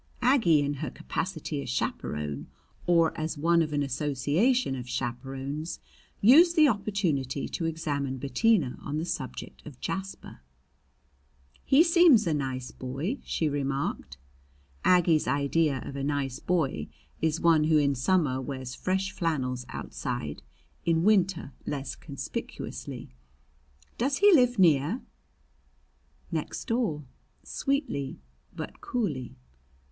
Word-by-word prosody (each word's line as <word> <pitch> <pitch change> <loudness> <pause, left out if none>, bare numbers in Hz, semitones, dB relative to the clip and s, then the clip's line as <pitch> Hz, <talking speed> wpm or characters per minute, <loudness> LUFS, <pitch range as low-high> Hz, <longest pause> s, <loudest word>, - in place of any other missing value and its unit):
Aggie 225 - +5
in 145 0 0
her - - -2
capacity 65 +2 -4
as 70 - -7
chaperon, 75 +3 -3 0.4
or 170 -2 +4
as 155 0 -3
one 170 +3 +3
of 155 -2 -1
an 145 -1 +1
association 145 - +1
of 125 -1 -7
chaperons, 135 +5 -4 0.4
used 330 - +7
the 310 -2 +7
opportunity 185 - -1
to 165 - -3
examine 145 -5 -2
Bettina 145 - +1
on 145 +2 -4
the 160 - -2
subject 130 -6 -5
of 140 -5 -11
Jasper. 195 0 -5 1.2
"He 280 +4 +6
seems 335 - +6
a 165 - +1
nice 130 -3 -3
boy," 140 - -4
she 160 - -1
remarked. 140 - -2 0.7
Aggie's 175 -4 +4
idea 140 +1 +1
of 140 - -7
a 140 - -3
nice 140 -2 -1
boy 140 - 0 0.3
is 160 0 +1
one 160 -2 +4
who 155 0 +4
in 140 -1 +3
summer 135 -1 +1
wears 130 -2 -5
fresh 190 +6 -1
flannels 130 -7 -2
outside, 75 -1 -5 0.4
in 165 -1 +2
winter 190 -8 +2
less 135 -2 -3
conspicuously. 65 - -7 0.9
"Does 270 +3 +1
he 405 0 +6
live 250 -5 +4
near?" 165 - +3 1.3
"Next - - -3
door," 225 - -1 0.4
sweetly 275 - -2 0.4
but - - -7
coolly. 150 - -3
150 Hz, 120 wpm, -28 LUFS, 135-190 Hz, 1.3 s, used